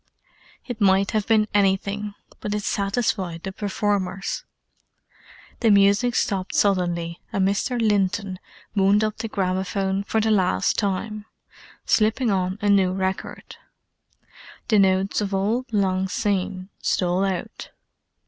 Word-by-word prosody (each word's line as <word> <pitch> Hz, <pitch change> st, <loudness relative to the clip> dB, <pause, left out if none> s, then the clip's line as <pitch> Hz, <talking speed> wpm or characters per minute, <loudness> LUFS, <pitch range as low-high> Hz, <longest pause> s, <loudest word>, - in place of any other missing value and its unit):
It 240 Hz, -3 st, -6 dB
might 195 Hz, 0 st, +3 dB
have 215 Hz, -2 st, -1 dB
been 215 Hz, -2 st, +3 dB
anything, 200 Hz, +1 st, 0 dB, 0.2 s
but 210 Hz, 0 st, -3 dB
it 210 Hz, -, -3 dB
satisfied 195 Hz, -5 st, -1 dB
the 190 Hz, -, -4 dB
performers. 200 Hz, -1 st, -2 dB, 1.2 s
The 230 Hz, -, +3 dB
music 200 Hz, +4 st, +4 dB
stopped 190 Hz, -3 st, -1 dB
suddenly, 175 Hz, -4 st, 0 dB
and 190 Hz, -1 st, +1 dB
Mr. 235 Hz, +5 st, -1 dB
Linton 200 Hz, -3 st, 0 dB, 0.4 s
wound 200 Hz, +2 st, +4 dB
up 215 Hz, 0 st, -1 dB
the 225 Hz, -, -3 dB
gramophone 190 Hz, 0 st, -1 dB
for 220 Hz, -, 0 dB
the 220 Hz, 0 st, +1 dB
last 180 Hz, -, +2 dB
time, 210 Hz, +1 st, -2 dB, 0.6 s
slipping 220 Hz, +2 st, +2 dB
on 185 Hz, 0 st, 0 dB
a -, -, +2 dB
new 190 Hz, -2 st, +4 dB
record. 190 Hz, 0 st, -4 dB, 1.1 s
The 215 Hz, -3 st, +5 dB
notes 190 Hz, +1 st, +2 dB
of 200 Hz, -1 st, -2 dB
"Auld 230 Hz, +7 st, -1 dB
Lang 190 Hz, -3 st, +1 dB
Syne," 190 Hz, -2 st, -2 dB
stole 180 Hz, +1 st, +1 dB
out. 190 Hz, -3 st, -4 dB
200 Hz, 125 wpm, -23 LUFS, 190-210 Hz, 1.2 s, The